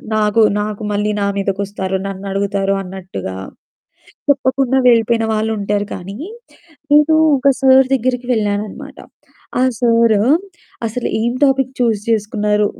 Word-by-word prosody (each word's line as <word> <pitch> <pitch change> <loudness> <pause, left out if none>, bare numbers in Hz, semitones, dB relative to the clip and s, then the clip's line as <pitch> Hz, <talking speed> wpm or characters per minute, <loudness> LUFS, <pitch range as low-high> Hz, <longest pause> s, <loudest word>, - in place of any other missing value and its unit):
నాకు, 215 +1 +2 0.2
నాకు 215 +1 -5
మళ్ళీ 210 +1 0
నా - - +1
మీదకొస్తారు 195 -1 -2
నన్ను 195 0 -7
అడుగుతారు 195 0 0
అన్నట్టుగా 180 - -7 1.0
చెప్పకుండా 265 -1 +1
వెళ్ళిపోయిన 230 -1 +3
వాళ్ళుంటారు 210 -2 -1
కానీ, 195 +4 -8 0.7
నేను 300 +2 +5 0.2
ఒక 280 +2 +2
సారు 265 0 +6
దగ్గరికి 250 0 -1
వెళ్ళాననమాట. 205 -1 -3 0.6
ఆ - - +3 0.2
సారు 230 -3 +3 0.7
అసలు 235 +3 -3
ఏం 235 +1 +1
టాపిక్ 270 -1 +2
చూజ్ 225 -4 +1
జేసుకున్నారు. 210 -1 +1
215 Hz, 115 wpm, -17 LUFS, 200-245 Hz, 1.0 s, సారు